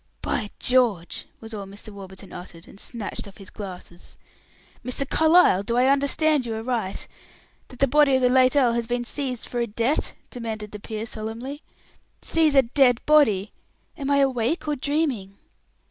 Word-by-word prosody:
"By 215 -4 -1
George!" 235 -9 +1
was 225 0 -9
all 200 -2 -6
Mr. 200 +3 -9
Warburton 195 -1 -11
uttered, 175 -2 -10
and 195 - -14
snatched 220 -3 -5
off 195 - -13
his 195 -2 -12
glasses. 180 -3 -10 0.7
"Mr. 255 +3 -2
Carlyle, 320 - +5
do 235 +4 -1
I 250 - +4
understand 280 +1 +2
you 230 -2 -3
aright 225 -4 -3 0.6
that 255 - -13
the 275 - +3
body 285 0 +4
of 260 - +2
the 250 - +5
late 255 +1 +4
earl 250 -5 +4
has 235 -1 -1
been 240 0 -2
seized 255 -2 -3
for 245 - -3
a 235 - 0
debt?" 235 +7 0 0.2
demanded 220 -4 -5
the 210 - -8
peer, 220 +1 -5
solemnly. 230 +6 -6 0.6
"Seize 315 -3 +2
a 270 - +7
dead 245 -1 +3
body! 220 -10 +4 0.4
Am 275 -1 -4
I 280 - +3
awake 265 +4 0
or 300 - 0
dreaming?" 265 -9 -1
240 Hz, 170 wpm, -24 LUFS, 210-275 Hz, 0.7 s, a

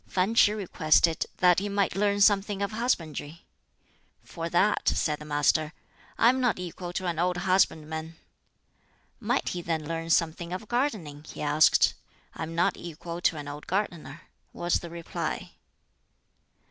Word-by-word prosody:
Fan 190 +4 0
Ch'i 220 -2 +6
requested 165 -4 +2
that 180 -1 +4
he 205 +1 -3
might 200 -3 0
learn 205 0 +1
something 200 0 +3
of 200 - -2
husbandry. 170 - -3 0.8
"For 165 0 -6
that." 200 +5 +2
said 150 -2 0
the 150 - -9
Master, 150 +2 +1 0.4
"I 230 - +6
am 260 +1 +1
not 245 -3 +2
equal 180 0 -6
to 185 - -3
an 170 -2 -2
old 180 +1 +1
husbandman." 160 -4 0 1.0
Might 240 +3 0
he 175 - -4
then 165 -2 -2
learn 165 0 -4
something 170 +1 +1
of 190 +4 -6
gardening? 210 - -2
he - - -7
asked. 150 +1 +4 0.4
"I - - -9
am 165 +1 -4
not 170 - +1
equal 170 +1 -7
to 165 - +2
an 145 -1 -7
old 145 +1 -8
gardener." 170 -5 -3 0.3
was 175 0 0
the 170 - -8
reply. 170 0 -5
175 Hz, 155 wpm, -27 LUFS, 160-200 Hz, 1.0 s, Ch'i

